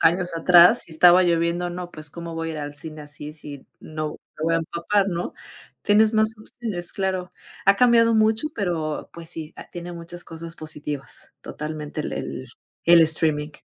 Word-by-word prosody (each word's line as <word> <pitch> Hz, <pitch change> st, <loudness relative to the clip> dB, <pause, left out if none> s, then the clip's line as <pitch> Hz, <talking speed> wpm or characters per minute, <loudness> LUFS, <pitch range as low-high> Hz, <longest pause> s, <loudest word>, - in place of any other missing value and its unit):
años 175 Hz, +1 st, +3 dB
atrás 175 Hz, +1 st, +7 dB
si 165 Hz, -, -12 dB
estaba 180 Hz, +3 st, +7 dB
lloviendo, 170 Hz, +1 st, +1 dB
"No, 175 Hz, 0 st, -6 dB
pues, 155 Hz, -1 st, -8 dB
¿cómo 170 Hz, 0 st, -7 dB
voy 165 Hz, 0 st, -3 dB
a -, -, -4 dB
ir 155 Hz, -, -5 dB
al 145 Hz, 0 st, -5 dB
cine 155 Hz, +1 st, -8 dB
así 145 Hz, +1 st, -8 dB
si 145 Hz, -3 st, -10 dB
no, 155 Hz, -1 st, -4 dB, 0.3 s
me 155 Hz, -, -2 dB
voy 165 Hz, 0 st, +2 dB
a -, -, +4 dB
empapar?", 190 Hz, +5 st, 0 dB
¿no?, 175 Hz, -1 st, -3 dB, 0.5 s
tienes 215 Hz, +2 st, +4 dB
más 220 Hz, +1 st, +3 dB
opciones, 215 Hz, -6 st, -5 dB
claro, 190 Hz, -2 st, -2 dB, 0.3 s
ha 195 Hz, +1 st, +6 dB
cambiado 230 Hz, -1 st, +5 dB
mucho, 220 Hz, +6 st, +3 dB
pero 165 Hz, -7 st, -2 dB
pues 165 Hz, -1 st, -10 dB
sí, 160 Hz, -1 st, -7 dB
ha -, -, -10 dB
tiene 175 Hz, 0 st, -7 dB
muchas 170 Hz, +1 st, -6 dB
cosas 165 Hz, 0 st, -8 dB
positivas, 150 Hz, -3 st, -5 dB
totalmente, 150 Hz, 0 st, -5 dB
el 130 Hz, -, -5 dB, 0.4 s
el 170 Hz, 0 st, +7 dB
streaming. 155 Hz, -1 st, +1 dB
170 Hz, 175 wpm, -23 LUFS, 155-180 Hz, 0.5 s, atrás